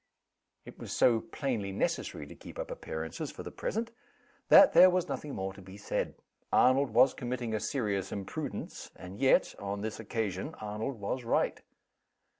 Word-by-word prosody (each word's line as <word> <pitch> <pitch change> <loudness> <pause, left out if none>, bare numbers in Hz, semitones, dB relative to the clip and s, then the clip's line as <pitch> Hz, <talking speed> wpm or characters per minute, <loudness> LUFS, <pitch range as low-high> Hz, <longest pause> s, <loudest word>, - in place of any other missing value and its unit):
It - - -12
was - - -7
so 115 -2 +4
plainly 115 -9 -3
necessary 95 -5 -2
to - - -11
keep - - -12
up - - -5
appearances 80 0 -5
for - - -8
the - - -7
present, 225 +2 -3 0.6
that - - +9
there 185 - +9
was 180 -1 +1
nothing 145 -2 -4
more 95 0 -3
to 95 - -13
be 95 +1 -11
said. 100 - -2 0.4
Arnold 130 +2 +4
was 130 - +5
committing 120 -2 -3
a 110 - 0
serious 105 -4 -2
imprudence 100 -2 -5
and 90 +3 -10
yet, 135 0 +4
on 100 0 -4
this 110 +1 -4
occasion, 110 - -3
Arnold 110 +4 -4
was 120 +5 -3
right. 115 - 0
110 Hz, 165 wpm, -31 LUFS, 100-130 Hz, 0.6 s, that